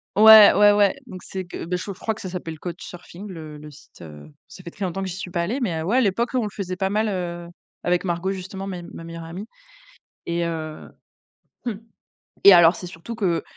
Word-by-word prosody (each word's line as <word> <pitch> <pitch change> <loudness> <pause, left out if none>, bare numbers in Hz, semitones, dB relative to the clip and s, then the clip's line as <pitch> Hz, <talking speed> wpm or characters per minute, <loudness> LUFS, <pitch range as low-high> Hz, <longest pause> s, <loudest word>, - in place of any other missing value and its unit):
Ouais, 220 0 +10
ouais, 205 0 +6
ouais, 205 +1 +3
donc 185 -6 -10
c'est 190 -1 -6
que, 175 - -7
bah, 180 +2 -2
je 180 - -6
je 200 - -5
crois 220 - -2
que - - -11
ça 185 - -5
s'appelle 170 -3 -6
CouchSurfing, 175 +2 -9
le 155 -4 -9
le 150 +1 -11
site, 150 0 -17
heu, 75 -2 -12 0.2
ça 185 - -13
fait 170 - -8
très 200 - -7
longtemps 190 +1 -2
que 190 - -3
j'y 175 - -5
suis 185 -1 -6
pas 175 -1 -1
allée, 225 +11 -2
mais 170 -9 -1
heu, - - -3
ouais, 205 +9 +1
à - - +5
l'époque, 230 +2 +1
on 255 - +2
le 215 - -2
faisait 185 -3 -4
pas 190 +1 -1
mal, 215 +2 +1
heu, 175 -3 -4 0.4
avec 175 0 +1
Margot 175 +1 -1
justement 190 0 -6
mes 185 -3 -5
ma 170 -1 -10
meilleure 165 0 -8
amie. 175 +5 -7 0.8
Et 170 0 -1
heu, 155 -2 -5 0.8
mmh 240 - -1 0.7
et 200 - +10
alors, 170 0 +7
c'est 180 - -8
surtout 175 +6 -8
que, 185 -7 0
180 Hz, 235 wpm, -23 LUFS, 170-200 Hz, 0.8 s, Ouais